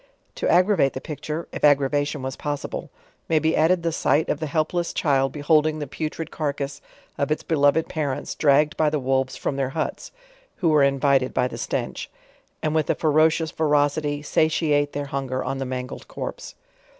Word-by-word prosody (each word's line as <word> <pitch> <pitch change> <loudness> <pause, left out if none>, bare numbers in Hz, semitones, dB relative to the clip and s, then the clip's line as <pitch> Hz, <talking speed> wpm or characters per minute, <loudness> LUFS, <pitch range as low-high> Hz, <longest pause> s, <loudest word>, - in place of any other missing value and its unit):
To - - -2
aggrevate 180 -5 +3
the - - -4
picture, 150 +3 -5
if - - -7
ag 145 -1 +7
gravation 145 0 -1
was 130 0 -4
possible, 145 -1 -4 0.4
may 160 - +3
be 160 +1 +2
added 170 +2 +3
the 165 - 0
sight 155 -1 +1
of 150 - 0
the 155 - -3
help 155 +1 0
Ices 175 -1 -2
child 135 -3 +2
beholding 155 +1 +2
the 150 - -4
putrid 155 +3 -5
carcase 140 -2 -3 0.4
of 140 - 0
its 155 - -1
beloved 150 0 +2
parents 145 -5 -3
dragged 150 +1 +3
by 155 -1 +3
the 150 - -1
wolves 130 -1 0
from 140 - -3
their 135 -2 0
huts, 155 +3 -4 0.4
(who 170 - +1
were 155 -2 +4
invited 140 -1 +2
by 125 - +2
the - - -8
stench) - - -3 0.5
and 155 - 0
with 155 -2 0
a - - +3
ferocious 155 +1 +2
verocity, 145 -1 +1
satiate 150 -1 +1
their 145 0 -3
hun 135 -1 -4
ger 130 0 -2
on 135 - -3
the 135 - -2
mangled 125 0 -6
corpse. - - -7
145 Hz, 185 wpm, -24 LUFS, 140-155 Hz, 0.5 s, ag